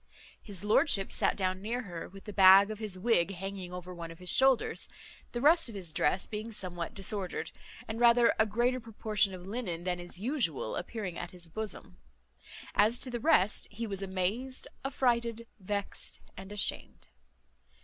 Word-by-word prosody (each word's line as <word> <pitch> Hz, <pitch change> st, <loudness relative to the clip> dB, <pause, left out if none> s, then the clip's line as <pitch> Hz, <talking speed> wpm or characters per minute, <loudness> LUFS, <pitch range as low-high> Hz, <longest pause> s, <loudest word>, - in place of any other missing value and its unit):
His 200 Hz, -4 st, -3 dB
lordship 210 Hz, -1 st, +3 dB
sat -, -, +2 dB
down 185 Hz, -1 st, -1 dB
near 235 Hz, +5 st, -2 dB
her, 175 Hz, -5 st, -7 dB
with 195 Hz, +1 st, -13 dB
the 210 Hz, -, -8 dB
bag 195 Hz, +1 st, +8 dB
of 215 Hz, -, -6 dB
his 210 Hz, -4 st, -3 dB
wig 195 Hz, -2 st, +2 dB
hanging 190 Hz, -1 st, -6 dB
over 180 Hz, 0 st, -7 dB
one 170 Hz, -1 st, -7 dB
of 165 Hz, -, -10 dB
his 180 Hz, 0 st, -1 dB
shoulders, 265 Hz, -3 st, +2 dB, 0.4 s
the 240 Hz, -, -3 dB
rest 315 Hz, 0 st, +5 dB
of 225 Hz, -, -9 dB
his 175 Hz, -5 st, -5 dB
dress 170 Hz, +6 st, +1 dB
being 215 Hz, +1 st, -6 dB
somewhat 175 Hz, -5 st, -4 dB
disordered, 195 Hz, -1 st, -2 dB, 0.4 s
and 220 Hz, +1 st, -4 dB
rather 235 Hz, 0 st, +6 dB
a 220 Hz, -, +4 dB
greater 240 Hz, +4 st, +1 dB
proportion 215 Hz, -3 st, 0 dB
of 180 Hz, -1 st, -9 dB
linen 190 Hz, -5 st, -4 dB
than 180 Hz, -1 st, -1 dB
is 175 Hz, 0 st, -7 dB
usual 215 Hz, -, -1 dB
appearing 190 Hz, -2 st, -4 dB
at 175 Hz, -, -5 dB
his 175 Hz, -2 st, -10 dB
bosom. 205 Hz, -, -6 dB, 0.8 s
As 220 Hz, +4 st, +4 dB
to 255 Hz, -, +1 dB
the 240 Hz, -, -3 dB
rest, 215 Hz, -, +3 dB
he 225 Hz, +3 st, -5 dB
was 200 Hz, -3 st, -3 dB
amazed, 195 Hz, +8 st, -2 dB, 0.2 s
affrighted, 235 Hz, -4 st, 0 dB
vexed, 200 Hz, +1 st, -4 dB
and 190 Hz, +1 st, -10 dB
ashamed. 205 Hz, -1 st, -2 dB
200 Hz, 170 wpm, -31 LUFS, 185-230 Hz, 0.8 s, bag